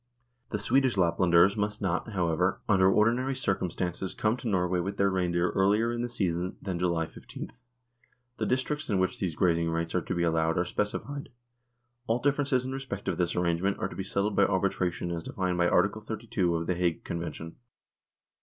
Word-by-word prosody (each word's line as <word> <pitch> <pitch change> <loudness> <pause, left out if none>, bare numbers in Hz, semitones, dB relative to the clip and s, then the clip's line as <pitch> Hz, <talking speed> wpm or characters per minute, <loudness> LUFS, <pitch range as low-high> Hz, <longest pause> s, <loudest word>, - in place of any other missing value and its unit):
The 105 - -1
Swedish 130 +4 +2
Laplanders 85 +1 +4
must 105 0 -1
not, 95 +3 -2
however, 90 0 +1
under 95 -3 +5
ordi 110 +3 +4
nary 130 +1 -1
circumstances 95 -5 -2
come 110 +1 +1
to 125 - -6
Norway 90 -3 +1
with 100 +3 -3
their 100 0 +3
rein 90 -2 0
deer 85 +1 +1
earlier 105 +4 +2
in 120 - -2
the 120 - -2
season 90 -5 -2
than 95 -3 -4
June 85 -2 +1
15. - - -9 0.9
The - - -1
districts 130 +3 -1
in 100 - +2
which 95 0 0
these 90 -5 -2
grazing 85 -1 +2
rights 85 0 -2
are 90 - +1
to 90 - -3
be 85 - 0
allowed 80 -1 +1
are 90 - +2
specified. 140 +10 -3 0.8
All 115 - +2
differences 140 -1 +1
in 130 - -4
respect 135 -7 -5
of - - -1
this 85 -1 0
arrange 85 -1 +1
ment 100 +1 +1
are - - -1
to - - -9
be 95 - -3
settled 100 +1 -1
by - - +5
arbitration 95 -3 0
as 85 -1 -3
defined 90 -2 -2
by 85 - +4
Article 100 +4 +2
32 105 -5 -1
of 85 0 -1
The 90 - +1
Hague 85 -2 -1
Convention. 85 -1 -5
95 Hz, 195 wpm, -29 LUFS, 85-110 Hz, 0.9 s, under